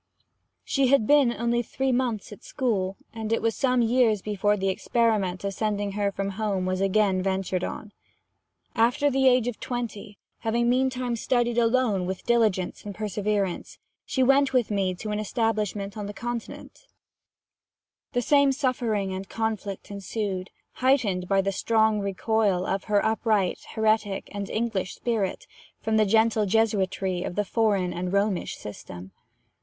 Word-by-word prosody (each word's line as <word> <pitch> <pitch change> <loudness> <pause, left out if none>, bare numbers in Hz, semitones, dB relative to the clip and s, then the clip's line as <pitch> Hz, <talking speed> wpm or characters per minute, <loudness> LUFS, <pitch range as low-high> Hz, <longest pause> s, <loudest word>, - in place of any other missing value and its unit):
She 275 -1 +1
had 275 0 +5
only 240 -4 +3
been - - -7
three 265 +3 -1
months 240 -5 -1
at 210 +4 -11
school; 195 -7 -1 0.2
and 220 -1 -5
it 230 - +2
was 225 -1 0
some 250 -3 +2
years 230 -3 +2
before 210 0 +1
the 195 0 0
experiment 200 -3 0
of 200 0 -2
sending 205 -1 -1
her 200 0 0
from 195 0 -3
home 195 -4 0
was 185 0 -1
again 195 -1 +2
ventured 190 -1 -1
on. 210 - -5 0.8
After 245 +5 +2
the 265 0 +3
age 250 -2 +4
of 245 - -4
twenty, 225 -4 -5 0.2
having 235 +1 0
meantime 255 -1 +1
studied 240 0 +1
alone 230 -6 +2
with 190 0 -5
diligence 220 -6 +1
and 205 -2 -7
perseverance, 205 -3 -2 0.3
she 260 - 0
went 275 +1 +4
with 245 -4 +2
me 190 -3 0
to 210 +4 -5
an 210 - -1
establishment 215 -2 -1
on 210 -2 -5
the 205 - -7
Continent: 240 - -6 1.3
the 245 - +1
same 280 0 +4
suffering 240 -8 -1
and 190 +1 -6
conflict 215 -3 -3
ensued, 200 -1 -4 0.3
heightened 220 -9 +2
by 195 0 +3
the 195 +1 -1
strong 220 +1 +2
recoil 200 -1 0
of 195 0 -2
her 205 -1 +2
upright, 220 -3 +1 0.2
heretic 215 -2 +1
and 200 -1 -5
English 220 -5 -2
spirit 220 -6 -2 0.3
from 220 0 0
the 215 -1 +4
gentle 220 0 +3
Jesuitry 195 -3 +1
of 180 - -4
the 210 - 0
foreign 200 -5 +1
and 180 +1 -3
Romish 200 -1 0
system. 95 -2 -9
215 Hz, 155 wpm, -26 LUFS, 195-235 Hz, 1.3 s, had